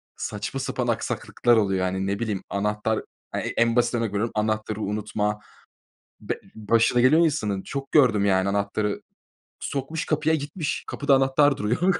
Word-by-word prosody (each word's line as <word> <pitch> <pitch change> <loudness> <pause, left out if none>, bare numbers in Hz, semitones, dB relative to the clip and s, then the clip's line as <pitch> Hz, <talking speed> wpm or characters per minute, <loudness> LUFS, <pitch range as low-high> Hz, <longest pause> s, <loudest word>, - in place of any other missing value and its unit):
saçma - - -4
sapan - - -2
aksaklıklar 120 -1 +1
oluyor. 95 -3 +1
Yani 95 +1 -2
ne 100 +2 -1
bileyim 105 -5 -2
anahtar, 105 +2 -1 0.4
e - - 0
en 115 0 +1
basit 120 0 +2
örnek 115 -2 0
veriyorum 105 +3 -1
anahtarı 110 0 -1
unutma. 105 0 -2 0.8
Be - - -4
başına 115 +3 +2
geliyor 155 +7 +5
insanın. 105 -11 0
Çok 135 0 -6
gördüm 115 -9 +5
yani 95 -1 +2
anahtarı. 100 +1 -1 0.6
Sokmuş 140 +3 -3
kapıya 155 +1 +1
gitmiş. 150 +2 -3
Kapıda 145 -1 +2
anahtar 135 +2 +3
duruyor. 155 - +1
110 Hz, 145 wpm, -25 LUFS, 105-135 Hz, 0.8 s, geliyor